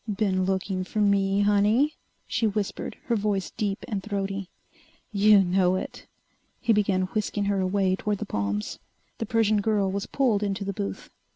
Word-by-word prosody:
"Been 195 -2 +1
looking 190 0 -1
for 200 +4 -4
me, 200 -1 +3
honey?" 210 +8 +3 0.3
she 230 -3 0
whispered, 205 -1 -3
her 235 - +1
voice 205 -3 -1
deep 200 -1 -3
and 205 -3 -2
throaty. 195 -2 -3 0.6
"You 205 -1 +6
know 180 0 +2
it!" 185 - -6 0.5
He 230 -2 +2
began 195 -3 +2
whisking 210 -1 -1
her 200 -1 +1
away 190 0 +1
toward 210 +1 -2
the 215 - -4
palms. 100 - -2 0.4
The 225 - -3
Persian 215 -2 +2
girl 200 -2 +1
was 200 +1 -3
pulled 240 -7 +1
into 200 -1 -2
the 200 - -2
booth. 100 - -5
200 Hz, 165 wpm, -26 LUFS, 190-210 Hz, 0.6 s, You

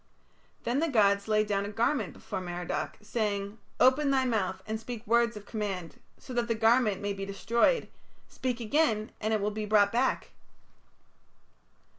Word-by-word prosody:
Then 245 +4 0
the 330 - +1
gods 200 -6 +3
laid 215 0 +3
down 200 -1 0
a 200 - -4
garment 225 - 0
before - - -6
Merodach, 175 -1 -4
saying: 210 -1 -2 0.2
"Open 270 +3 +5
thy 265 -1 +2
mouth 190 -6 -1
and 220 0 -3
speak 230 0 -7
words 235 0 +2
of 205 - -10
command, 195 -7 -4 0.2
so 255 - -10
that 240 -1 0
the 230 - 0
garment 225 -2 +3
may 205 0 -1
be 195 0 -6
destroyed; 230 - +1 0.4
speak 250 -2 -3
again 225 -3 +1
and 215 0 0
it 215 - +2
will 205 +1 -1
be 210 0 -4
brought 205 -1 +4
back." 250 +3 0
215 Hz, 165 wpm, -29 LUFS, 200-240 Hz, 0.4 s, Open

